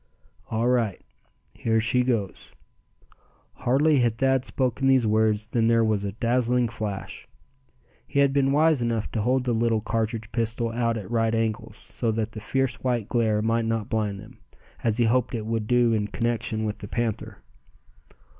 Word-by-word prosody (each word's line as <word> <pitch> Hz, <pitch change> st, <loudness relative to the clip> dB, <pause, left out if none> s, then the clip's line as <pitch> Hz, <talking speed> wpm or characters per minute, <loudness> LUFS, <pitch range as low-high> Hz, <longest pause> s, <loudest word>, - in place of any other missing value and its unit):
"All 115 Hz, +2 st, 0 dB
right. 120 Hz, -6 st, +1 dB, 0.5 s
Here 110 Hz, -1 st, 0 dB
she 115 Hz, +3 st, +2 dB
goes!" 115 Hz, -6 st, -2 dB, 1.0 s
Hardly 145 Hz, +4 st, +2 dB
had 120 Hz, -2 st, +1 dB
Thad 135 Hz, 0 st, +2 dB
spoken 130 Hz, 0 st, -1 dB
these 130 Hz, -3 st, +4 dB
words 110 Hz, 0 st, +2 dB
than 115 Hz, 0 st, 0 dB
there 115 Hz, 0 st, +4 dB
was 110 Hz, -2 st, 0 dB
a 100 Hz, -1 st, -3 dB
dazzling 120 Hz, +1 st, +1 dB
flash. 105 Hz, -4 st, -6 dB, 0.8 s
He -, -, -5 dB
had 140 Hz, -1 st, +4 dB
been 135 Hz, -1 st, +2 dB
wise 155 Hz, -1 st, +3 dB
enough 115 Hz, -2 st, -1 dB
to 110 Hz, -, -1 dB
hold 125 Hz, +4 st, +1 dB
the 125 Hz, -1 st, 0 dB
little 115 Hz, -1 st, +1 dB
cartridge 110 Hz, +1 st, -2 dB
pistol 115 Hz, 0 st, -1 dB
out 115 Hz, 0 st, 0 dB
at 105 Hz, 0 st, -8 dB
right 115 Hz, -1 st, +1 dB
angles, 110 Hz, -1 st, -2 dB
so 115 Hz, -, -3 dB
that 110 Hz, 0 st, -2 dB
the 110 Hz, -, -7 dB
fierce 130 Hz, +2 st, -1 dB
white 120 Hz, -5 st, -1 dB
glare 110 Hz, -3 st, +1 dB
might 115 Hz, +1 st, +1 dB
not 115 Hz, -2 st, -2 dB
blind 105 Hz, -3 st, -1 dB
them, 110 Hz, +2 st, -14 dB, 0.4 s
as 115 Hz, -2 st, +1 dB
he 120 Hz, -, +3 dB
hoped 125 Hz, +2 st, +1 dB
it 110 Hz, -2 st, -4 dB
would 110 Hz, -1 st, -2 dB
do 120 Hz, -1 st, +3 dB
in 105 Hz, -2 st, 0 dB
connection 115 Hz, -1 st, -1 dB
with 105 Hz, 0 st, -4 dB
the 100 Hz, -, -8 dB
panther. 115 Hz, 0 st, -3 dB
115 Hz, 175 wpm, -25 LUFS, 110-125 Hz, 1.0 s, these